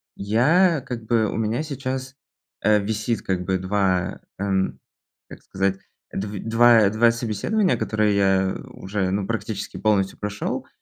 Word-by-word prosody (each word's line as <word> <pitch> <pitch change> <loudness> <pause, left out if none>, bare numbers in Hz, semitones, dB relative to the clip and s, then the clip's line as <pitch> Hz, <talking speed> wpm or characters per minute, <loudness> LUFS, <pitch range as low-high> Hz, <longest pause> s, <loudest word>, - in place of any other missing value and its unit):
я 145 - +3
как 115 -3 -6
бы, 115 -1 +2
у - - -4
меня 115 +5 -1
сейчас, 130 -2 -5 0.5
э, 105 0 +4
висит 110 +2 -2
как 90 -1 -2
бы 95 0 +1
2 95 -1 0 0.2
м, 95 -1 -1 0.5
как - - -12
сказать, 95 0 -1 0.3
дв 100 0 -4
два 115 -2 +5
два 110 +3 +4
собеседования, 115 - 0
которые 105 -1 +1
я 95 -1 +2 0.2
уже, 95 -1 -2
ну, 100 0 -1
практически 110 -1 -4
полностью 100 -3 +1
прошел, 105 0 -3
105 Hz, 140 wpm, -23 LUFS, 95-115 Hz, 0.5 s, два